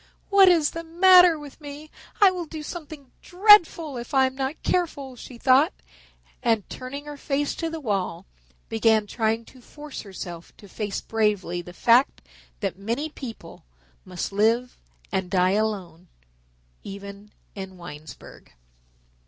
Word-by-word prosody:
"What 395 Hz, -1 st, +7 dB
is 330 Hz, -4 st, +3 dB
the 330 Hz, -, -6 dB
matter 355 Hz, 0 st, +6 dB
with 295 Hz, 0 st, -12 dB
me? 295 Hz, +1 st, -10 dB, 0.3 s
I 400 Hz, -2 st, +7 dB
will 360 Hz, -2 st, -5 dB
do 310 Hz, 0 st, -7 dB
something 300 Hz, -4 st, -9 dB
dreadful 355 Hz, -, +5 dB
if 240 Hz, +4 st, -6 dB
I 265 Hz, 0 st, +5 dB
am 260 Hz, -, -2 dB
not 270 Hz, +3 st, -4 dB
careful," 285 Hz, -7 st, -1 dB
she 245 Hz, 0 st, -11 dB
thought, 255 Hz, -, +4 dB, 0.7 s
and 225 Hz, -4 st, +1 dB
turning 280 Hz, +3 st, -7 dB
her 295 Hz, -1 st, -8 dB
face 280 Hz, +1 st, -1 dB
to 330 Hz, -, -2 dB
the 325 Hz, 0 st, -5 dB
wall, 195 Hz, -, -2 dB, 0.4 s
began 220 Hz, -1 st, +2 dB
trying 225 Hz, +1 st, -1 dB
to 255 Hz, -, -17 dB
force 295 Hz, +3 st, -9 dB
herself 175 Hz, -4 st, -9 dB
to 205 Hz, -, -14 dB
face 205 Hz, 0 st, -4 dB
bravely 210 Hz, -5 st, -1 dB
the 175 Hz, -, -11 dB
fact 235 Hz, +8 st, +3 dB, 0.4 s
that 185 Hz, -, -3 dB
many 235 Hz, +10 st, -2 dB
people 230 Hz, -, -10 dB, 0.4 s
must 180 Hz, +1 st, -5 dB
live 230 Hz, +5 st, +1 dB, 0.4 s
and 190 Hz, -2 st, -2 dB
die 185 Hz, -1 st, +2 dB
alone, 190 Hz, -5 st, -2 dB, 0.7 s
even 200 Hz, +1 st, -10 dB, 0.2 s
in 190 Hz, -2 st, -8 dB
Winesburg. 155 Hz, -3 st, -12 dB
245 Hz, 145 wpm, -24 LUFS, 200-300 Hz, 0.7 s, What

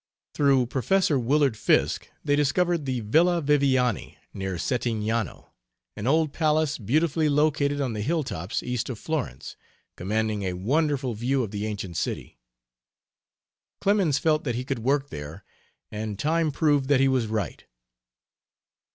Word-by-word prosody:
Through 135 Hz, -3 st, +3 dB
Prof. 160 Hz, +10 st, +1 dB
Willard 140 Hz, -1 st, +2 dB
Fiske, -, -, +1 dB, 0.2 s
they 145 Hz, -1 st, +3 dB
discovered 165 Hz, +2 st, +1 dB
the 130 Hz, -3 st, -2 dB
Villa 170 Hz, +11 st, +3 dB
Viviani, 135 Hz, -, +1 dB, 0.2 s
near 95 Hz, -1 st, -3 dB
Settignano, 115 Hz, +1 st, -2 dB, 0.4 s
an 105 Hz, +2 st, -4 dB
old 155 Hz, +1 st, +2 dB
palace 155 Hz, -2 st, +1 dB
beautifully 155 Hz, +7 st, +1 dB
located 145 Hz, -1 st, +2 dB
on 130 Hz, -5 st, -1 dB
the 105 Hz, -, -3 dB
hilltops 115 Hz, -, -2 dB
east 125 Hz, 0 st, -2 dB
of 125 Hz, -, -4 dB
Florence, 135 Hz, -, -4 dB, 0.4 s
commanding 110 Hz, +2 st, -1 dB
a 95 Hz, -2 st, -2 dB
wonderful 135 Hz, -, 0 dB
view 125 Hz, +4 st, 0 dB
of 105 Hz, -, -5 dB
the 105 Hz, 0 st, -3 dB
ancient 100 Hz, -5 st, -5 dB
city. -, -, -4 dB, 1.4 s
Clemens 195 Hz, -8 st, +2 dB
felt 155 Hz, 0 st, +1 dB
that 120 Hz, -5 st, -2 dB
he 125 Hz, +1 st, -3 dB
could 115 Hz, -, -2 dB
work 135 Hz, +4 st, 0 dB
there, 75 Hz, +6 st, -8 dB, 0.5 s
and 105 Hz, -1 st, -4 dB
time 160 Hz, +4 st, +1 dB
proved 145 Hz, -2 st, +2 dB
that 140 Hz, -2 st, +4 dB
he 135 Hz, -, +4 dB
was 130 Hz, -4 st, +1 dB
right. 105 Hz, -7 st, -3 dB
130 Hz, 140 wpm, -26 LUFS, 110-150 Hz, 1.4 s, that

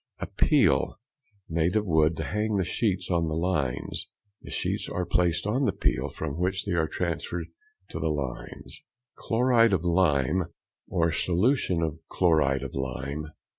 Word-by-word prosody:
A -, -, -4 dB
peel, -, -, +3 dB, 0.5 s
made 85 Hz, +3 st, 0 dB
of 105 Hz, -1 st, +2 dB
wood, 80 Hz, -2 st, +3 dB
to -, -, -2 dB
hang 105 Hz, +1 st, -1 dB
the 95 Hz, -2 st, +1 dB
sheets 95 Hz, +1 st, -1 dB
on 85 Hz, -2 st, +2 dB
the 80 Hz, -, -2 dB
lines. 80 Hz, -7 st, -1 dB, 0.3 s
The -, -, -11 dB
sheets -, -, -2 dB
are 90 Hz, -, -2 dB
placed 85 Hz, -1 st, +1 dB
on 125 Hz, +7 st, +1 dB
the -, -, +3 dB
peel, -, -, 0 dB
from 80 Hz, 0 st, -5 dB
which 95 Hz, +2 st, 0 dB
they 100 Hz, -, -2 dB
are 80 Hz, -2 st, +2 dB
transferred 85 Hz, +1 st, -3 dB, 0.4 s
to -, -, -4 dB
the 80 Hz, 0 st, 0 dB
lines. 70 Hz, -5 st, -5 dB, 0.3 s
_Chloride 115 Hz, -2 st, +3 dB
of 90 Hz, -3 st, +1 dB
lime 85 Hz, -1 st, +2 dB, 0.4 s
for 85 Hz, -1 st, +2 dB
solution 90 Hz, -, +1 dB
of 80 Hz, 0 st, -2 dB
chloride 75 Hz, -7 st, +2 dB
of -, -, -6 dB
lime. 70 Hz, +3 st, -4 dB
85 Hz, 160 wpm, -27 LUFS, 80-95 Hz, 0.5 s, peel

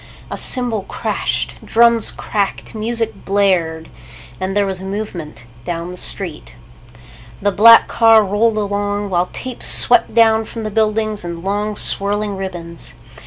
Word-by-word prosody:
A -, -, -3 dB
cymbal 245 Hz, -5 st, 0 dB
crashed. -, -, -3 dB
Drums 235 Hz, -1 st, +3 dB
cracked. 200 Hz, -2 st, -3 dB
Music 225 Hz, +1 st, -3 dB
blared. 180 Hz, -5 st, 0 dB, 0.5 s
And 190 Hz, +2 st, -2 dB
there 205 Hz, -, +3 dB
was 190 Hz, -1 st, -4 dB
a -, -, -10 dB
movement 190 Hz, -, -6 dB, 0.2 s
down 170 Hz, +4 st, -4 dB
the -, -, -8 dB
street. -, -, -1 dB, 0.9 s
The 205 Hz, -, +1 dB
black 230 Hz, +4 st, +7 dB
car 225 Hz, -1 st, +5 dB
rolled 215 Hz, +3 st, +1 dB
along, 205 Hz, 0 st, -2 dB
while 180 Hz, 0 st, 0 dB
tape 255 Hz, -1 st, -6 dB
swept 235 Hz, -2 st, +3 dB
down 225 Hz, -1 st, +4 dB
from 225 Hz, +1 st, -7 dB
the 215 Hz, -, -4 dB
buildings 215 Hz, -1 st, 0 dB
in 170 Hz, -1 st, -6 dB
long 205 Hz, +2 st, -2 dB
swirling 205 Hz, +1 st, -2 dB
ribbons. 175 Hz, -3 st, -4 dB
205 Hz, 140 wpm, -17 LUFS, 190-220 Hz, 0.9 s, black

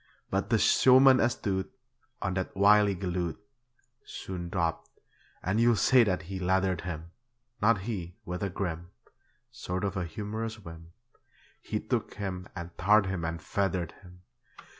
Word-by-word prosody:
But -, -, -1 dB
the -, -, +4 dB
showman 130 Hz, 0 st, +6 dB
astute 100 Hz, -5 st, -1 dB, 0.5 s
On 100 Hz, -, -1 dB
that 95 Hz, +1 st, -3 dB
wily 100 Hz, 0 st, +5 dB
galoot 90 Hz, -2 st, -3 dB, 0.6 s
Soon 90 Hz, -2 st, -6 dB
dropped, 85 Hz, -2 st, -2 dB, 0.5 s
and 95 Hz, +5 st, 0 dB
you'll 120 Hz, 0 st, +5 dB
say 125 Hz, +3 st, +5 dB
that 95 Hz, -4 st, -1 dB
he 95 Hz, +2 st, -6 dB
leathered 95 Hz, -1 st, +1 dB
him 85 Hz, -1 st, -6 dB, 0.5 s
Not 105 Hz, -1 st, +3 dB
he; 95 Hz, -5 st, -5 dB
with 90 Hz, +1 st, -5 dB
a 100 Hz, -, -1 dB
grim 85 Hz, -2 st, -4 dB, 0.6 s
Sort 95 Hz, -6 st, -4 dB
of 100 Hz, -2 st, -1 dB
humorous 110 Hz, +4 st, -5 dB
whim, 85 Hz, -4 st, -12 dB, 0.7 s
He -, -, -3 dB
took -, -, -3 dB
him 95 Hz, -3 st, -5 dB
and 85 Hz, -1 st, -7 dB
tarred 105 Hz, +3 st, +5 dB
him 95 Hz, -2 st, -3 dB
and 80 Hz, 0 st, -3 dB
feathered 90 Hz, -1 st, -1 dB
him. 90 Hz, -1 st, -16 dB
95 Hz, 140 wpm, -29 LUFS, 85-105 Hz, 0.7 s, showman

